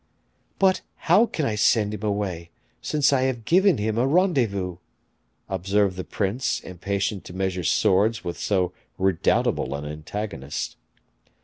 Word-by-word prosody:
"But 190 -1 +3
how 195 +8 +4
can 155 - -2
I 110 - 0
send 105 0 +2
him 105 - -6
away, 100 -5 -2 0.3
since 145 -2 +2
I 130 - +3
have 120 -4 -5
given 190 +2 +4
him 110 +2 -1
a 125 - +2
rendezvous?" 120 - +1 0.7
observed 95 +1 +1
the 95 - -4
prince, 105 +8 -1
impatient 100 +2 -3
to - - -9
measure 95 -1 -1
swords 95 +8 +2
with 85 - -5
so 90 -3 0 0.2
redoubtable 95 -6 +1
an 70 +1 -5
antagonist. 75 0 -5
100 Hz, 135 wpm, -24 LUFS, 90-120 Hz, 0.7 s, how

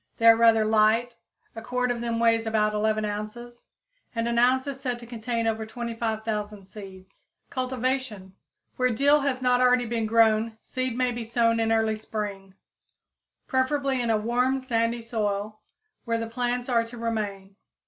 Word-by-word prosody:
They 230 - -1
are 230 0 +9
rather 225 -1 +4
light; 220 +2 +3 0.4
a 225 - -6
quart 250 +1 -1
of 235 -1 -3
them 230 -1 -2
weighs 230 -1 +2
about 215 -1 +1
11 215 0 0
ounces, 215 +4 -6 0.5
and 230 0 -1
an 235 0 +1
ounce 255 +2 +3
is 275 -2 -5
said 250 -3 -2
to 240 - -11
contain 230 0 -3
over 220 -1 -1
25,000 220 -3 -4
seeds. 190 -1 -13 0.2
Cultivation. 255 -6 -3 0.4
Where 255 0 +2
dill 280 +6 +4
has 270 -2 -2
not 250 0 +3
already 250 -1 +4
been 225 -1 -2
grown 220 0 +3
seed 255 -2 -3
may 255 -1 +1
be 240 -1 -4
sown 230 0 +1
in 225 0 +1
early 220 -1 +2
spring, 205 -3 -6 0.9
preferably 265 0 0
in 235 - -1
a 220 - +3
warm 250 +4 +1
sandy 230 -2 -1
soil, 215 -2 -2 0.5
where 230 -1 0
the 230 - -3
plants 245 +1 -2
are 235 -3 +2
to 230 +1 -10
remain. 205 -4 -4
230 Hz, 165 wpm, -26 LUFS, 220-245 Hz, 0.9 s, are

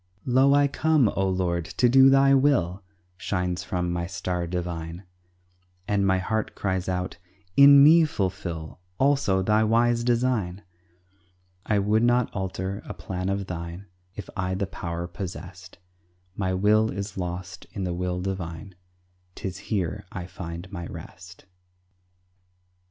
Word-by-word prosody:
"Lo, 135 +2 +4
I 145 0 +4
come, 150 -4 +2
O 95 -1 0
Lord, 90 -2 0
to 100 +8 +1
do 135 +2 +7
Thy 135 0 +5
will!" 125 - +2 0.4
Shines 90 -2 -2
from 90 -1 -2
my 85 0 -2
star 90 -1 -3
divine, 85 0 -4 0.8
And 100 -1 +1
my 95 0 +3
heart 110 +4 -2
cries 95 -2 -2
out, 90 0 -3 0.4
"In 140 0 +9
me 160 +2 +7
fulfill 90 - -4 0.2
Also, 135 -9 +2
Thy 105 +3 +3
wise 120 +2 +2
design." 115 -6 0 1.0
I 105 - +2
would 105 +2 +2
not 120 +1 +2
alter 95 +1 -4
a - - -7
plan 90 0 -4
of 100 0 -1
thine 85 +1 -6 0.3
If 105 - -7
I 95 -1 -1
the 100 +1 -1
power 85 -2 -5
possessed; 90 0 -8 0.6
My 95 -2 -1
will 105 +4 +3
is 100 0 -5
lost 90 -1 -6
in 100 - -5
the 90 -1 -2
will 90 0 -2
divine, 90 -1 -5 0.6
'Tis 95 -1 -5
here 90 -6 -2
I 90 -2 -6
find 90 0 -8
my 85 -4 -6
rest. 90 +2 -11
95 Hz, 140 wpm, -25 LUFS, 90-110 Hz, 1.0 s, In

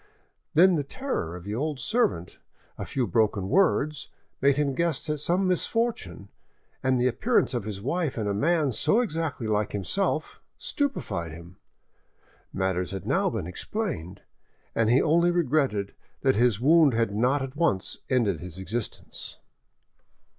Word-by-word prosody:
Then 185 +4 +7
the 145 - 0
terror 140 - -4
of 90 - -9
the 100 +2 -5
old 145 +4 -2
servant, 210 - 0 0.4
a - - -5
few 130 -3 0
broken 105 -5 +1
words, 155 -6 +2 0.3
made 140 0 +4
him 145 -2 +1
guess 165 0 -1
at 150 - -2
some 175 +6 +1
misfortune, 180 - -1 0.5
and 130 -1 +2
the 125 - +2
appearance 215 - +2
of 120 -5 -2
his 100 -2 -5
wife 155 +1 -1
and 110 -2 -1
of 100 - 0
a - - -2
man 155 -1 +2
so 210 - +2
exactly 160 - -2
like 105 -1 0
himself 155 - -1 0.2
stupefied 165 - -2
him. 85 +2 -12 0.9
Matters 95 -1 -1
had 95 -2 -6
now - - +2
been - - -3
explained, 95 - -4 0.5
and 115 -1 +2
he 125 +3 +4
only 170 +2 +4
regretted 140 - +1 0.3
that 130 -1 +3
his 115 -3 +3
wound 150 0 +5
had 115 -3 +1
not 130 +6 +2
at 135 +1 -7
once 150 - 0
ended 110 - +1
his 90 -1 -7
existence. 110 +4 -4
130 Hz, 155 wpm, -26 LUFS, 100-165 Hz, 0.9 s, Then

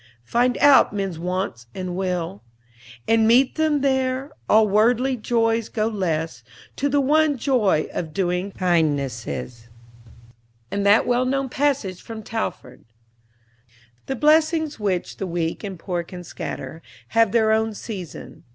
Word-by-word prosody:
Find 245 - +1
out 285 -1 +6
men's 195 -5 -3
wants 180 - -3
and 185 -2 -4
will, 180 - -3 0.7
And 225 -1 +4
meet 250 +3 +4
them 310 -2 +1
there. 265 0 0 0.2
All 215 0 +5
worldly 240 +6 +2
joys 225 -1 0
go 215 -1 -1
less 165 - -2 0.3
To 285 - 0
the 285 +1 +2
one 300 +1 +3
joy 225 - +1
of 165 -3 -4
doing 180 +3 -1
kindnesses;" 140 -9 -1 1.0
and 200 - -1
that 205 +2 +5
well 245 +1 +1
known 270 +1 -1
passage 260 -10 -1
from 225 -1 -8
Talfourd, 210 - -5 1.2
"The 270 - -2
blessings 310 +1 +2
which 190 -4 -2
the 195 - -4
weak 170 +1 -3
and 195 -3 -5
poor 175 0 -3
can 180 +1 -9
scatter, 165 -1 -7 0.3
Have 225 -2 +3
their 220 -1 +3
own 220 0 +1
season. 190 - -8
215 Hz, 135 wpm, -22 LUFS, 180-255 Hz, 1.2 s, out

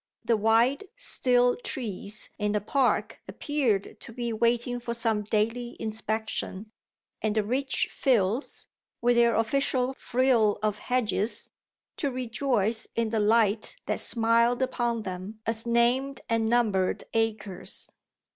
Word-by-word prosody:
The 235 - +3
wide, 230 - +3
still 245 - +3
trees 215 -4 -5
in 210 0 0
the 210 - +2
park 225 -1 0
appeared 225 -1 -1
to - - -9
be 235 0 -3
waiting 240 +2 +1
for 235 -1 -3
some 225 -2 0
daily 225 +3 -1
inspection, 220 -2 -3 0.6
and 215 -1 0
the 215 - +2
rich 265 +5 0
fields, 235 - 0 0.3
with 240 0 +3
their 235 -1 +4
official 255 +2 +1
frill 245 -5 +2
of 210 -1 0
hedges, 225 -3 -1 0.5
to 285 - 0
rejoice 235 -3 -1
in 230 -1 0
the 225 - +1
light 215 - +2
that - - -1
smiled 235 +2 +2
upon 235 -3 -1
them 190 +3 -6
as 225 +1 -1
named 245 +4 +2
and 225 -1 +1
numbered 215 -6 +1
acres. 215 -4 -1
230 Hz, 125 wpm, -27 LUFS, 215-245 Hz, 0.6 s, their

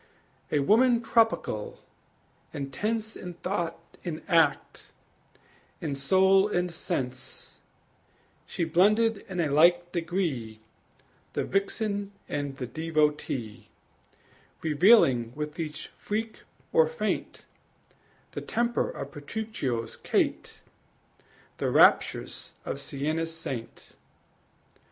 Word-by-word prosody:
A 150 - +2
woman 235 - +4
tropical, 215 - +1 0.8
intense 215 - -3
In 180 -1 -8
thought 175 -2 -2 0.3
and 165 -3 -5
act, 170 -4 +1 0.9
in 150 -3 -3
soul 190 +8 +4
and 180 -4 -1
sense, 130 -7 -4 0.9
She 175 - -2
blended 210 +7 +3
in 185 -2 -4
a 160 -3 +1
like 175 +4 +4
degree 160 - -2 0.7
The - - 0
vixen 200 0 -1
and 145 -2 -3
the 130 - -3
devotee, 150 -7 -1 0.9
Revealing 150 - +5
with 150 +1 -5
each 155 -1 -5
freak 220 +2 -5 0.3
or 480 0 +6
feint 480 0 -3 0.9
The - - -5
temper 235 +1 0
of - - -7
Petruchio's 145 - -4
Kate, - - -1 1.0
The - - 0
raptures - - +3
of - - -3
Siena's 160 +4 -2
saint. 130 -8 -7
165 Hz, 95 wpm, -28 LUFS, 145-205 Hz, 1.0 s, or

